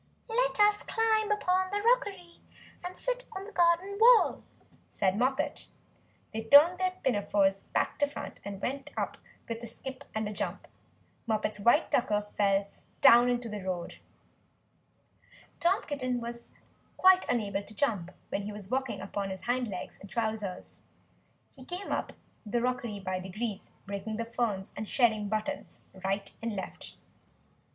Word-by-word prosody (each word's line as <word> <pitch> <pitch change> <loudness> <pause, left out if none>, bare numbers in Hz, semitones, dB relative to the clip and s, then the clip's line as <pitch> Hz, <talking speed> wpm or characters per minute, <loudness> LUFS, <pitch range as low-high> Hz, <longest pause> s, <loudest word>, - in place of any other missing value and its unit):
"Let - - +1
us 415 0 +5
climb 440 -1 +1
up 420 - +1 0.3
the 410 - 0
rockery, 405 -8 +1 0.4
and 360 +1 -6
sit - - -2
on 380 0 -6
the 430 - -10
garden 355 +3 +2
wall," 470 +1 +6 0.5
said 190 -2 +1
Moppet. 265 +6 0 0.7
They 220 - -2
turned 295 +10 +7
their 370 0 +1
pinafores 205 -5 +2
back - - -1
to 290 - +3
front, 285 - -7
and 200 -1 -6
went 270 +6 -3
up - - -2 0.3
with 230 0 -4
a 235 - -6
skip 265 +4 -8
and 220 -1 -1
a 210 - -4
jump; - - -4 0.6
Moppet's 215 -1 -1
white 235 +4 +4
tucker 210 -4 +2
fell 200 -1 +2 0.3
down 245 -2 +8
into 245 -1 -1
the 210 -2 -5
road. 180 -2 -4 1.6
Tom 355 +3 +2
Kitten 255 -4 -2
was 235 0 -7 0.5
quite 375 0 +6
unable 205 -5 0
to 215 +1 -12
jump 205 -11 0 0.2
when 205 +1 -3 0.2
walking 265 -1 -1
upon 200 0 -3
his 190 -1 -6
hind 245 +3 0
legs 185 -4 -6
in 195 - -11
trousers. 215 -4 -3 0.7
He 260 - -13
came 360 +8 -6
up - - -2 0.3
the 235 +2 -1
rockery 240 -4 -2
by 185 -1 -2
degrees, 200 +3 -5 0.2
breaking 200 +2 -4
the 230 - -2
ferns, 225 -4 -2
and 215 - -5
shedding 220 -5 +2
buttons 215 0 -3 0.2
right 195 +1 -1
and 230 -2 -2
left. 190 -2 -7
235 Hz, 150 wpm, -30 LUFS, 205-305 Hz, 1.6 s, down